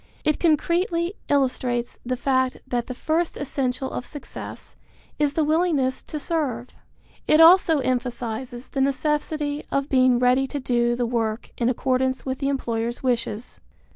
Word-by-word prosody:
It 305 - +1
concretely 340 +2 +1 0.2
illustrates 250 -3 0
the 255 +1 -2
fact 260 0 +1
that 245 -2 -2
the 255 - -5
first 320 +5 -1
essential 265 -2 -2
of - - -4
success 290 +1 -9 0.4
is 290 -1 +1
the 320 - +2
willingness 305 -4 +1
to 305 - -5
serve. 275 -7 -2 0.6
It 305 - +5
also 325 -2 +7
emphasizes 245 -1 -3
the 270 - -2
necessity 295 +1 -1
of 275 0 -1
being 255 -2 +4
ready 250 +2 +3
to 285 - -4
do 240 -2 +1
the 245 0 0
work 225 -2 -2
in 235 0 +1
accordance 260 +1 0
with 260 -1 -3
the 275 -1 0
employer's 235 -3 -2
wishes. 240 -2 -2
260 Hz, 145 wpm, -24 LUFS, 245-300 Hz, 0.6 s, also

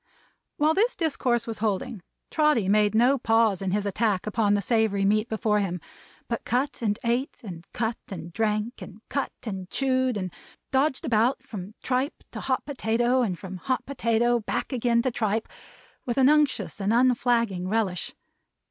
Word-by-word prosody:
While 305 +2 +3
this 445 +8 +2
discourse 260 - 0
was 225 -2 -5
holding, 220 +1 -2 0.3
Trotty 300 -10 +3
made 210 +1 +3
no 250 +4 +4
pause 225 -4 +3
in 195 - -1
his 205 +2 0
attack 200 -1 0
upon 210 -1 +2
the - - +2
savory 220 -3 +2
meat 215 +3 +2
before 215 -1 +1
him, 180 -3 -2 0.5
but 235 - -3
cut 260 +4 -1
and 210 -2 0
ate, 240 +3 0
and 175 -3 -8
cut 230 0 -2
and 170 -3 -7
drank, 215 +3 -1
and 210 +2 -11
cut 275 - -1
and 190 -5 -5
chewed, 260 -3 +1
and 185 -3 -4 0.4
dodged 265 +1 +1
about, 235 +3 +2
from 205 0 -8
tripe 260 +4 -1
to - - -6
hot 260 -1 -1
potato, 245 -2 +1
and 195 -7 -1
from 190 0 -7
hot 255 +8 -2
potato 240 -2 +1
back 225 - -3
again 235 -1 +2
to 255 - +1
tripe, 220 -1 -1 0.6
with 240 0 -3
an 265 0 +6
unctuous 300 -7 +1
and 195 +2 +1
unflagging 235 -6 +2
relish. 195 -4 -1
225 Hz, 165 wpm, -26 LUFS, 205-255 Hz, 0.6 s, an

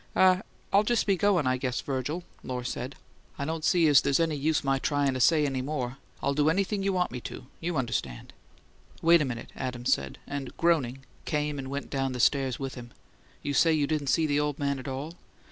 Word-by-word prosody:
"Ah 185 0 +5 0.3
I'll 200 - +7
just 235 +2 +1
be 195 - +3
goin', 185 -4 +2
I 130 0 +2
guess, 125 -1 -2
Virgil," 145 +6 -3 0.2
Lohr 125 -1 -4
said. 125 +2 -4 0.4
"I 140 - -2
don't 160 +1 -3
see 175 -1 +4
as 145 -3 +7
there's 140 +1 +2
any 165 -1 +2
use 150 +2 +1
my 135 -1 +1
tryin' 145 -1 +1
to 130 - -3
say 155 +3 +4
any 135 -2 -1
more. 130 -2 -3 0.3
I'll 140 - +2
do 150 +2 +3
anything 195 +4 0
you 195 0 +1
want 180 -1 0
me 125 - -5
to, - - -8
you 170 -1 -2
understand." 95 - -3 0.7
"Wait 170 0 +6
a - - +1
minute," 120 -3 -5
Adams 125 -1 0
said, 70 -1 -3
and, 140 -3 -6
groaning, 135 -6 +1 0.2
came 150 -1 -1
and 135 -1 -5
went 140 +1 -5
down 135 -1 -1
the 125 - -5
stairs 135 0 +2
with 135 -1 -4
him. 120 -2 -9 0.5
"You 145 - -2
say 165 +3 +4
you 150 -2 +2
didn't 150 -1 -1
see 160 +4 +3
the 145 -1 +1
old 150 -1 -1
man 140 -1 -1
at 130 - -8
all?" 140 +6 -5
140 Hz, 220 wpm, -28 LUFS, 130-160 Hz, 0.7 s, I'll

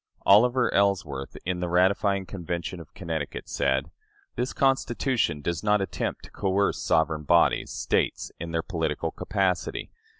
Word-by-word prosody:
" - - -38
Oliver 120 +5 +5
Ellsworth, 80 -9 0
in 90 0 -1
the 90 -1 -2
ratifying 95 +2 +2
Convention 85 -1 -5
of 85 - -13
Connecticut, 80 -5 -4
said: 70 +2 0 0.4
"This 125 +2 -1
Constitution 130 - +1
does 85 +4 -2
not 105 0 +3
attempt 95 - -3
to - - -13
coerce 100 0 0
sovereign 80 -1 +1
bodies, 85 +3 +3
States, - - -1
in 85 - -5
their 80 0 -1
political - - -2
capacity. 95 -3 -1
90 Hz, 140 wpm, -26 LUFS, 80-100 Hz, 0.4 s, Oliver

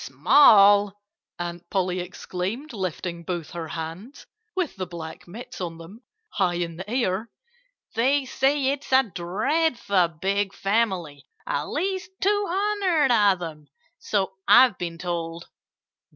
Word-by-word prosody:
"Small!" 200 - +5 0.4
Aunt 175 0 -6
Polly 185 -2 0
exclaimed, 190 +9 -5
lifting 180 -3 -4
both 170 -3 -4
her 170 -1 -5
hands 165 - -7 0.3
(with 365 -5 -2
the 185 -2 -4
black 165 -2 -9
mitts 220 +3 -9
on 170 -2 -4
them) 175 +8 -12 0.3
high 185 - 0
in 170 -1 -3
the 190 +3 -8
air. 225 -3 -1 0.6
"They 265 +5 +2
say 270 +1 +1
it's 280 -1 -6
a 265 0 +6
dreadful 200 - 0
big 195 +1 0
family 190 - -1 0.2
at 145 - -2
least 375 +3 -2
two 410 +1 +1
hundred 375 -7 +1
of 200 -6 +3
'em, 155 -3 -8 0.3
so 195 -2 -1
I've 255 -6 +7
been 170 -1 -4
told." 170 -1 -4
195 Hz, 130 wpm, -24 LUFS, 175-260 Hz, 0.6 s, I've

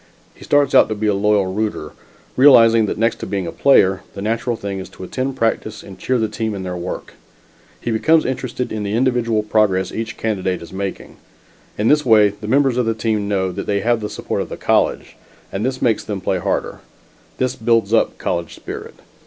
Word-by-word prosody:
He - - -15
starts 145 -1 +2
out - - +6
to 110 - -2
be 105 +1 -3
a 105 - +3
loyal 100 0 +2
rooter, 95 -5 -3 0.4
realizing 115 -5 +6
that - - -3
next 115 +2 +1
to - - -6
being 100 -2 -2
a 85 - -4
player, 95 -8 +4
the 100 - -6
natural 115 +2 -1
thing 100 -3 -5
is 95 - -8
to - - -11
attend 130 +7 -3
practice 115 -3 -1
and 95 - -12
cheer 130 - 0
the 110 -2 0
team 110 0 -3
in 95 - -5
their 90 -1 -4
work; 90 +1 -6 0.7
he 120 - -3
becomes 155 +8 +3
interested 125 -1 -3
in 110 - -3
the 105 +1 -2
individual 120 -3 +1
progress 105 -3 +1
each 110 0 -5
candidate 95 -5 -2
is 85 - -12
making. 95 0 -5 0.6
In 105 - 0
this 150 +2 +4
way, 110 -4 +5
the 105 +1 -9
members 135 0 +2
of 125 -2 +1
the 115 - 0
team 110 -2 -1
know 95 -2 0
that - - -6
they 100 -1 0
have 120 +1 +1
the 105 -1 -4
support - - -3
of - - -5
the - - -6
college, - - 0 0.3
and 95 - -3
this 130 +1 -2
makes 115 -3 +2
them 105 -2 -4
play 95 0 -1
harder. - - -2 0.6
This 130 0 -1
builds 115 -2 +1
up 115 - +2
college 85 -2 -3
spirit. - - -8
110 Hz, 210 wpm, -19 LUFS, 100-120 Hz, 0.7 s, out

